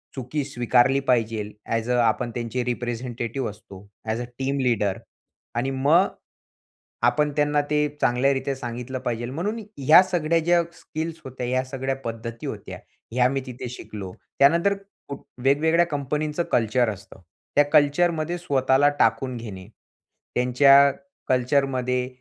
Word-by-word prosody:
चुकी 135 +3 -3
स्वीकारली 125 0 +2
पाहिजे. 110 -3 0
अ‍ॅज 115 +1 -2
अ 125 - +2
आपण 120 +1 0
त्यांचे 120 +1 -2
रिप्रेझेंटेटिव्ह 120 0 -3
असतो, 100 -2 -12 0.2
अ‍ॅज 110 +2 -2
अ - - -4
टीम 135 +1 -1
लीडर 110 -7 +1 0.6
आणि 130 +3 -1
मग 150 +8 +4 1.0
आपण 150 -1 +2
त्यांना 150 0 +2
ते 150 0 +2
चांगल्यारीत्या 135 +2 +1
सांगितलं 125 +1 -5
पाहिजे, 120 -2 -3
म्हणून 175 - -3 0.2
ह्या 145 +6 +7
सगळ्या 170 -3 +1
ज्या 170 +1 +3
स्किल्स 160 0 -6
होत्या, 130 -1 -5
या 130 +1 +1
सगळ्या 135 0 -3
पद्धती 115 0 -6
होत्या, - - -7 0.3
ह्या 125 +1 +3
मी 135 0 -1
तिथे 125 -1 -6
शिकलो. 105 -5 -8 0.3
त्यानंतर 170 +8 +5 0.7
वेगवेगळ्या 160 +5 +3
कंपनींचं 150 +2 -2
कल्चर 120 +1 +2
असतं, 100 -1 -9 0.3
त्या 145 - +6
कल्चरमध्ये 155 +3 +3
स्वतःला 140 -4 +2
टाकून 130 -2 +1
घेणे, 100 -5 -8 0.7
त्यांच्या 140 +3 +6 0.4
कल्चरमध्ये 125 -1 +1
130 Hz, 125 wpm, -24 LUFS, 120-145 Hz, 1.0 s, ह्या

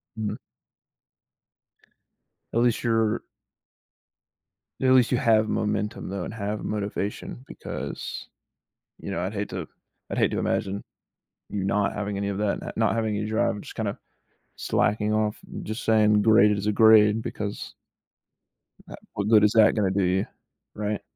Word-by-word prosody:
Mhm. 110 -2 -3 2.2
At 115 - +2
least 120 -1 +2
you're 115 -2 +1 1.6
at 130 - +3
least 130 -2 +5
you 125 - +3
have 110 -2 +3
momentum 105 -3 -2
though 95 -2 -3
and - - -6
have 105 -1 -4
motivation 105 +3 -4
because, - - -6 0.7
you - - -7
know, 85 - -2
I'd 95 +3 -2
hate 100 -1 -3
to 90 -3 -5 0.4
I'd - - -3
hate - - +3
to - - -1
imagine 100 +1 -1 0.7
you 100 -2 -3
not 100 +1 +1
having 105 -1 -3
any 100 0 -2
of 100 - -3
that 105 -1 0
not - - -7
not 110 0 +2
having 110 -2 0
any 105 - -2
drive, 110 -1 0
just - - -11
kinda - - -3 0.6
slacking 105 0 0
off, 110 -1 0 0.2
just 110 +2 -5
saying, 105 -1 +4
"Graded 105 -1 +5
as 100 - -4
a 105 - +2
grade" 110 0 +6
because 105 -2 -5 1.2
ah, - - -7 0.2
what 100 0 -2
good 105 -2 +6
is 105 - +5
that 110 -2 +5
gonna 100 -4 +1
do 100 0 +1
you? 95 +2 +1 0.5
Right? 105 0 -2
105 Hz, 155 wpm, -25 LUFS, 100-110 Hz, 2.2 s, grade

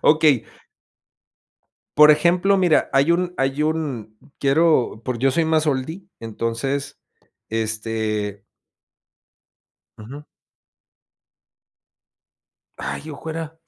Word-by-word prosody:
Okey. 150 -5 +4 1.5
Por 150 0 +9
ejemplo, 175 +6 +3
mira, 175 -4 +2
hay 140 +4 +3
un 175 +1 +1
hay 135 +2 0
un, 135 -9 -3 0.2
quiero 140 -5 +2
por 125 -1 -3
yo 135 +2 +2
soy 165 +3 +1
más 160 -1 +1
oldie, 150 +6 -2 0.2
entonces, 115 +6 -4 0.5
este 110 -2 -3 1.6
Ujú. 135 +8 -10 2.5
Ay, 155 - -5
ojo, 155 +2 -7
era 160 0 -6
140 Hz, 90 wpm, -21 LUFS, 115-160 Hz, 2.5 s, Por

